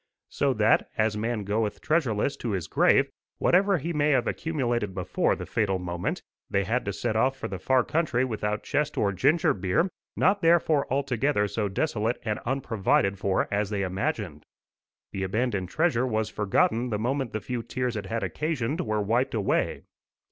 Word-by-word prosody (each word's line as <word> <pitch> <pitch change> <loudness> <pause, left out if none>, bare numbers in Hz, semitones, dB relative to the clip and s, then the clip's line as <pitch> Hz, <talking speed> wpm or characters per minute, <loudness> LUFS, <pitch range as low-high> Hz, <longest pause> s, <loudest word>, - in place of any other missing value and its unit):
So 140 -2 0
that, 110 0 +3
as 110 -1 +2
man 110 0 -2
goeth 105 +1 -1
treasureless 140 -6 +1
to 115 -4 -2
his 90 -4 -2
grave, - - +3 0.3
whatever 195 +2 +3
he 170 +3 -3
may 150 -1 +2
have 130 -4 +3
accumulated 120 - -1
before 90 -2 0
the - - -6
fatal 100 -4 0
moment, 90 -1 -3 0.3
they - - +1
had - - -1
to - - -1
set 110 - -2
off 130 +4 +2
for - - -4
the 95 -2 -6
far 130 +4 +3
country 145 -5 0
without 105 -3 -2
chest 150 0 -1
or 100 - +2
ginger 140 - +3
beer 95 - 0 0.2
not 200 +1 +2
therefore 165 -5 +3
altogether 135 -4 +1
so 105 0 -2
desolate 115 +1 -1
and 105 -1 -1
unprovided 110 -6 +1
for 95 -1 +1
as 100 -1 0
they 100 -2 -1
imagined. 95 - -3 0.7
The 95 - -4
abandoned 100 -1 -1
treasure 130 - +1
was 110 -2 -1
forgotten 110 +4 +1
the 105 - -1
moment 130 +2 -1
the 110 - -2
few 120 +4 -4
tears 125 0 -3
it 100 -2 -4
had 115 +1 -2
occasioned 145 - -2
were 110 -9 -1
wiped 120 +5 +1
away. 100 -3 0
115 Hz, 175 wpm, -27 LUFS, 105-135 Hz, 0.7 s, that